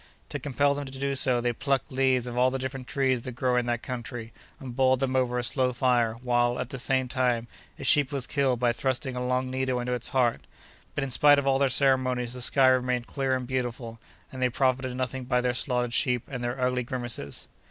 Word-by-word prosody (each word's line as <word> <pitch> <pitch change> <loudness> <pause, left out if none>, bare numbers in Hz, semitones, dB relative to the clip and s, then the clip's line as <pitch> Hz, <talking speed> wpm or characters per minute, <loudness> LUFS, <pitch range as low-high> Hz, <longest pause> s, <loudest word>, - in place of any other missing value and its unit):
To - - -4
compel 145 +1 +1
them 140 -1 -5
to 135 0 -8
do 140 0 -1
so, 130 -2 +4
they 120 0 0
plucked 135 +2 -1
leaves 130 -2 +2
of 120 -1 -5
all 125 +1 +3
the 135 - -3
different 130 -1 -5
trees 130 -4 0
that 130 +1 -7
grow 125 0 0
in 125 -1 +1
that 120 -1 -1
country, 120 -2 -6 0.3
and 130 -5 -8
boiled 130 0 +3
them 130 -1 -1
over 125 -1 +1
a 125 - -1
slow 125 +1 +2
fire, 120 -2 +1
while, 120 0 +1
at 125 - -4
the 135 - -5
same 130 +1 0
time, 125 -2 0 0.3
a - - -8
sheep 145 -2 +4
was 135 -3 -1
killed 135 -3 0
by 120 -1 +2
thrusting 130 +1 -2
a 125 - -3
long 130 +1 -1
needle 130 -1 -1
into 125 +1 -2
its 125 -1 -1
heart. 125 -3 +1 0.5
But, 145 - -1
in 135 - -4
spite 145 +2 +6
of 140 - 0
all 135 -1 +2
their 140 -1 +3
ceremonies, 130 -2 +1
the 125 - -7
sky 130 +1 +4
remained 125 -1 +1
clear 135 -1 -1
and 130 -1 -3
beautiful, 120 -2 -4 0.3
and 130 - -7
they 125 - +3
profited 130 0 0
nothing 130 0 -3
by 125 0 +1
their 125 0 0
slaughtered 125 -2 -1
sheep 125 -4 +2
and 125 -3 -6
their 120 +2 -3
ugly 125 0 +1
grimaces. 120 - -4
125 Hz, 230 wpm, -27 LUFS, 125-130 Hz, 0.5 s, spite